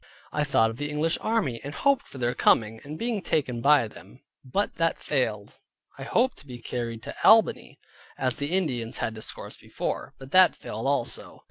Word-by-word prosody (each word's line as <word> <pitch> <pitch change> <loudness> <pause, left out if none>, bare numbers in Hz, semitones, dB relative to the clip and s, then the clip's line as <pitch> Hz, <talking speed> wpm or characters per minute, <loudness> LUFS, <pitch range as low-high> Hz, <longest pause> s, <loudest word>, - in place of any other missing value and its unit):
I 150 - 0
thought 115 -6 +3
of 115 - -10
the 145 +2 -3
English 155 +2 +1
army, 205 - 0
and 145 +2 -6
hoped 280 -1 +2
for - - -11
their 120 -1 0
coming, 110 0 +2
and 150 +2 -7
being 230 -1 -2
taken 130 -9 -1
by 145 -3 +5
them, - - -15 0.2
but 195 +11 -2
that 165 -1 +1
failed. 110 -8 -2 0.5
I - - -5
hoped 245 - +1
to 145 - -13
be 125 -2 -8
carried 115 -1 -5
to - - -6
Albany, 225 0 +5 0.4
as 130 -2 -1
the 145 +2 -3
Indians 120 -11 -2
had 115 - -2
discoursed 110 0 -8
before, - - -4
but 135 0 -12
that 185 -1 +6
failed 110 +5 -5
also. 140 -4 -2
135 Hz, 190 wpm, -26 LUFS, 115-160 Hz, 0.5 s, that